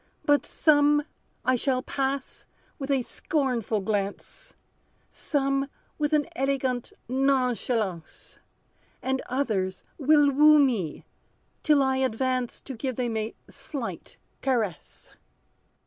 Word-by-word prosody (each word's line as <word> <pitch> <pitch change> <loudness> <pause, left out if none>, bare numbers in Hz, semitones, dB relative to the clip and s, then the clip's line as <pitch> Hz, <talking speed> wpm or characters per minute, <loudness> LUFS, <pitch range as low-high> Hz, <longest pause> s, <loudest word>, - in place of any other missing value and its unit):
But 290 0 +3
some 295 -1 +4 0.4
I 255 - +4
shall 255 +1 0
pass 275 -1 -3 0.3
with 275 0 -5
a 270 -3 +2
scornful 245 -8 -1
glance, 205 - -3 0.6
Some, 275 -1 -1 0.3
with 295 0 +1
an 300 -1 +3
elegant 260 -2 -1 0.2
nonchalance; 245 -8 -1 0.6
And 265 0 0
others 210 -8 -1 0.2
will 295 0 +5
woo 300 +2 +7
me, 230 - +1 0.6
till 295 -3 +4
I 265 0 +1
advance 255 0 -1
To 270 - -7
give 255 +1 -3
them 240 -2 -2
a 220 +1 -3
slight 270 -7 -7 0.2
caress." 225 - -2
265 Hz, 105 wpm, -26 LUFS, 230-280 Hz, 0.6 s, woo